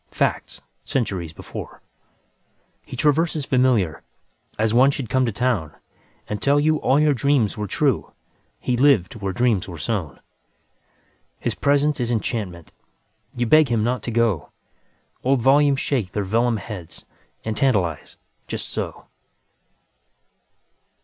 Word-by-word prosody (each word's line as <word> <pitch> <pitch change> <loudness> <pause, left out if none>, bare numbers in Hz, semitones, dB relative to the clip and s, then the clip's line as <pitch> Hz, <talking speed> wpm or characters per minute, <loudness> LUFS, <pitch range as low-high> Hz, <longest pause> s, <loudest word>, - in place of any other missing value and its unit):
Facts, - - -2 0.2
centuries 95 -10 -2
before, - - -9 1.0
He 130 - -9
traverses 150 +2 +1
familiar, 120 - +2 0.6
As 110 0 +1
one 130 +3 +6
should 135 -5 -3
come 130 -1 +2
to - - 0
townAnd 110 - -1 0.6
tell 140 +1 +3
you 155 +1 +2
all 140 -1 +2
your 150 -1 +4
dreams 135 -5 +1
were 105 -1 -4
true:He 125 +5 -3
lived 125 -8 +3
where 100 -1 -1
dreams 115 -3 +1
were 85 -3 -8
born. 95 - -3 1.2
His - - -2
presence 145 +1 +1
is 120 -1 -1
enchantment, 105 -7 -3 0.6
You 120 0 0
beg 155 +5 +5
him 115 -3 +1
not 120 0 0
to - - -5
go; 115 -8 +1 0.7
Old 130 -2 +2
volumes 140 +1 +4
shake 115 -12 -1
their 105 - -1
vellum 115 +4 +1
headsAnd 90 -7 -9 0.5
tantalize, 95 - 0 0.3
just - - -4
so. - - -5
120 Hz, 125 wpm, -22 LUFS, 100-135 Hz, 1.2 s, one